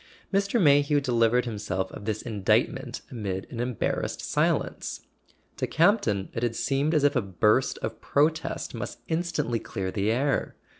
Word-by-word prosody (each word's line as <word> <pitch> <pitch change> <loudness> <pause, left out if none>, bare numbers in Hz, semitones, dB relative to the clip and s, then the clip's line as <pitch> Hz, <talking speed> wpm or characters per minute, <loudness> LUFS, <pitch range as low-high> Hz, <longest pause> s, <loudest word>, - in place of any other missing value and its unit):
Mr. 200 +4 +2
Mayhew 145 -3 +5
delivered 125 -2 +2
himself 100 -5 -3
of 105 - -9
this 110 -1 -2
indictment 105 -5 0
amid 100 -5 -3
an 115 - -6
embarrassed 120 -2 -1
silence. - - -1 0.6
To - - -1
Campton 155 - +2
it 115 - -3
had 120 -1 0
seemed 145 +5 +1
as 150 - +3
if 145 +1 +3
a 125 - +3
burst 105 +6 +2
of - - -4
protest 155 +3 0
must - - -6
instantly 160 -8 -1
clear 95 -4 -4
the 100 +2 0
air. 135 +4 0
125 Hz, 150 wpm, -27 LUFS, 105-145 Hz, 0.6 s, Mayhew